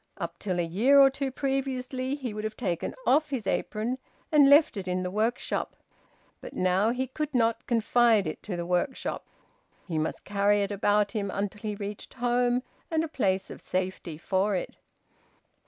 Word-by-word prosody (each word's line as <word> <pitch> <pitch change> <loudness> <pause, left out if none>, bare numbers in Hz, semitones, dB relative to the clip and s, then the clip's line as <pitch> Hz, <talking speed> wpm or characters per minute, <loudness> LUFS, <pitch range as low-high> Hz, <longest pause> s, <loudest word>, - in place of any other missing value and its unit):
Up 170 -2 -5
till 185 -3 -2
a - - +2
year 230 +12 +4
or 270 -1 +8
two 275 0 -2
previously 265 -1 -2
he 260 -6 -5
would 210 0 -5
have 215 0 -4
taken 180 -8 -2
off 300 +3 +3
his 260 -7 -3
apron 220 +6 -1 0.3
and 290 -3 +6
left 290 -2 +6
it 195 -2 -5
in 180 0 -1
the 180 - -3
workshop; 220 +4 -1 0.7
but - - -9
now 185 +4 +2
he 250 +2 -1
could 300 +4 -4
not 230 -1 +1
confide 230 -2 +3
it 155 - -5
to 185 -4 -5
the 170 - -3
workshop; 180 +9 -1 0.6
he 165 -4 -1
must 155 - -3
carry 205 0 +2
it 200 - -3
about 205 0 +2
him 205 -3 -2
until 200 +1 -3
he 210 -2 -3
reached 205 0 -7
home 245 0 +1 0.3
and 320 -1 +1
a - - -2
place 195 -10 -1
of - - -9
safety 185 -3 -3
for 190 +4 0
it. 180 - -4
215 Hz, 180 wpm, -28 LUFS, 190-255 Hz, 0.7 s, or